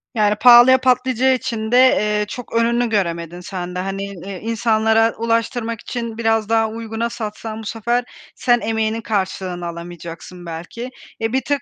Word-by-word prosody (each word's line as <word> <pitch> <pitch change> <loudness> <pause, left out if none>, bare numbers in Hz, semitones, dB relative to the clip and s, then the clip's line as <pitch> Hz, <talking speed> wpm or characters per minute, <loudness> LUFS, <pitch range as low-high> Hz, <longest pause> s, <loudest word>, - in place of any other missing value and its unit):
Yani, 210 -1 +3
pahalıya 245 +3 +8
patlayacağı 255 0 +2
için 220 -3 -4
de, 245 - +5
eee, 210 -5 +4
çok 245 +3 -8
önünü 235 +1 +2
göremedin 170 -4 -2
sen 180 -1 -6
de. - - -2
Hani, 195 +1 -3
i 195 -1 -8
insanlara 225 0 +2
ulaştırmak 230 0 -1
için 235 -2 -5
biraz 225 -1 +1
daha 225 -1 +2
uyguna 225 +1 -4
satsan 220 -1 -6
bu - - -10
sefer 235 +3 -1 0.3
sen 240 -1 +2
emeğinin 220 0 -1
karşılığını 190 -4 -2
alamayacaksın 170 +1 -9
belki. 170 +9 -7 0.3
E, 225 +1 -1
bir 265 - +2
tık 285 0 -1
225 Hz, 155 wpm, -20 LUFS, 195-235 Hz, 0.3 s, pahalıya